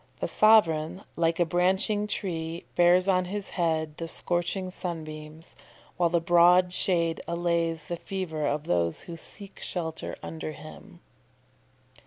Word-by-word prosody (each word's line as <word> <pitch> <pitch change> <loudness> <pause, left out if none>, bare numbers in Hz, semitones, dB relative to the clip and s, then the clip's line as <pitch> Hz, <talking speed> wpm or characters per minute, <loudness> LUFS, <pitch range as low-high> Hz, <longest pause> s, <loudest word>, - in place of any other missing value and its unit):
The - - -1
sovereign, 185 -5 +4
like 165 0 +1
a 175 - +4
branching 190 +4 +1
tree, 165 -4 -4
bears 175 +2 +5
on 185 -2 +3
his 200 +2 -5
head 160 -3 -1
the 165 - -5
scorching 180 +3 -2
sunbeams, 155 -3 -7 0.4
while 175 -2 +2
the 170 0 +2
broad 175 +2 +5
shade 170 -3 +1
allays 170 -2 -1
the 170 +3 -5
fever 170 -6 -3
of 145 +1 -1
those 85 - 0
who 170 - -8
seek 200 +4 -13
shelter 160 -3 -4
under 160 -1 -5
him.") 175 +4 -13
170 Hz, 135 wpm, -27 LUFS, 160-185 Hz, 0.4 s, bears